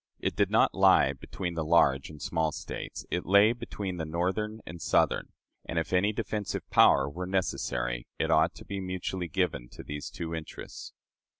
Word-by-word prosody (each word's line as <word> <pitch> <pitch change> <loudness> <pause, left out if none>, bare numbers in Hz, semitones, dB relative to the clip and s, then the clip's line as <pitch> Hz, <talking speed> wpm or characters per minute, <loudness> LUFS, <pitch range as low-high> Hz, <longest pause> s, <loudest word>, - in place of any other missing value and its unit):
It - - -2
did - - +2
not - - +4
lie 70 - +5
between 85 +6 -5
the 80 -1 -2
large 75 -4 +3
and 75 -1 -11
small 80 +2 0
States; - - -6
it 90 - 0
lay 100 +4 +5
between 100 -6 -5
the 80 - -2
Northern 95 +7 -1
and 85 -1 -9
Southern; - - +2 0.3
and, 85 - -5
if 80 +2 -1
any 95 +3 +3
defensive 105 -2 -3
power 70 - +6
were 90 +5 -5
necessary, - - -1
it 80 - 0
ought 80 0 +3
to - - -12
be 100 -1 -4
mutually 90 -1 -3
given 80 -9 -1
to - - -10
these 75 0 -6
two 85 -1 -5
interests." 80 -1 -7
85 Hz, 180 wpm, -29 LUFS, 80-95 Hz, 0.3 s, power